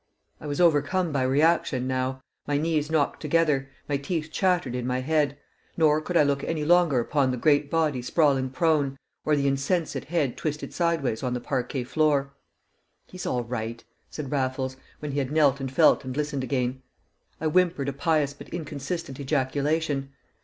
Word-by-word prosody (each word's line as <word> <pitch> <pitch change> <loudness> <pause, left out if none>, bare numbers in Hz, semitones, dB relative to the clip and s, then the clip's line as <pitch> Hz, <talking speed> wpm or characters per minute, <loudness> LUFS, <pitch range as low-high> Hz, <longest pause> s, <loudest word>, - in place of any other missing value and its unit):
I 150 - -8
was 145 -1 -3
overcome 170 +1 +3
by 140 -2 0
reaction 135 -1 +2
now; 130 0 -2 0.2
my 145 0 +1
knees 155 -1 0
knocked 155 -3 0
together, 150 -3 +1 0.2
my 145 - 0
teeth 155 +2 -3
chattered 180 -8 +1
in 125 -1 -3
my 130 0 0
head; 145 0 +1 0.4
nor 155 -2 +4
could 175 +2 -1
I - - +6
look 140 -1 0
any 155 -2 -2
longer 170 -5 +4
upon 135 +3 +1
the 125 - -1
great 145 +2 +3
body 155 -5 +1
sprawling 135 -1 +2
prone, 140 0 +1 0.3
or 155 - +3
the 140 -1 0
insensate 140 +1 0
head 150 -5 -1
twisted 150 -1 -4
sideways 165 -10 0
on 125 -1 -1
the - - -2
parquet 125 +1 -2
floor. 140 0 +1 0.7
"He's 185 -2 -7
all 125 -1 0
right," 115 -1 -5 0.3
said 145 -4 -6
Raffles, 130 -1 -1 0.3
when 150 -1 -4
he 140 - -1
had 135 -1 -2
knelt 145 -3 +3
and 135 -1 -4
felt 155 +2 +4
and 130 0 -5
listened 145 -3 -1
again. 130 0 -1 0.6
I 160 - -4
whimpered 165 -3 +2
a 140 - -1
pious 145 0 +1
but 140 - -12
inconsistent 150 -2 -5
ejaculation. 140 +1 -1
145 Hz, 175 wpm, -26 LUFS, 130-155 Hz, 0.7 s, I